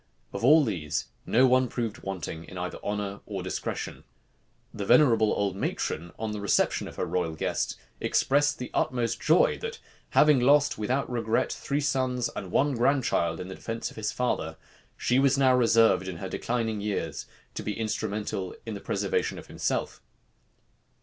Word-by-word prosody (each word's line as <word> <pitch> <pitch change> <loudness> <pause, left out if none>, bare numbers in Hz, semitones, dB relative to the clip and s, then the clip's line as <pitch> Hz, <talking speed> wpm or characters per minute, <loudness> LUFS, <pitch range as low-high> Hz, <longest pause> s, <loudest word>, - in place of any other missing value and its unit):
Of - - -5
all 150 +5 +7
these, 80 - -2 0.2
no 125 +4 +5
one 130 0 +4
proved 115 -2 -3
wanting 85 -4 -5
either 90 0 -4
in - - -25
honor 100 -1 -3
or 100 -4 -4
discretion. 95 - -4 0.7
The 105 - -4
venerable 115 -3 +5
old 100 -2 0
matron, 85 -3 -3
on 110 -1 -3
the 105 -1 -4
reception 100 - +1
of - - -10
her - - -2
royal 85 -3 -1
guest, - - -2 0.2
expressed 145 +2 +2
the 125 - -6
utmost 120 -3 0
joy, - - +4
that - - -5 0.3
having 150 -3 +5
lost, 145 +2 +4
without 130 +6 0
regret, 115 -2 0
three 140 +1 -2
sons 130 -3 0
and - - -5
one 145 +1 +2
grandchild 120 - +1
in 90 - -6
defence 115 +4 -5
of - - -15
his 110 -1 -2
father, 80 -10 -2 0.4
she 125 +1 +2
was 135 0 +4
now 130 -2 +5
reserved, 115 -5 +4
in 90 -3 -5
her 95 - -5
declining 115 -2 -2
years, 95 -8 -3 0.3
to - - -4
be 105 +1 -4
instrumental 105 - -3
in - - -4
the - - -6
preservation 455 -1 -1
of - - -9
himself. - - -2
115 Hz, 165 wpm, -27 LUFS, 100-130 Hz, 0.7 s, all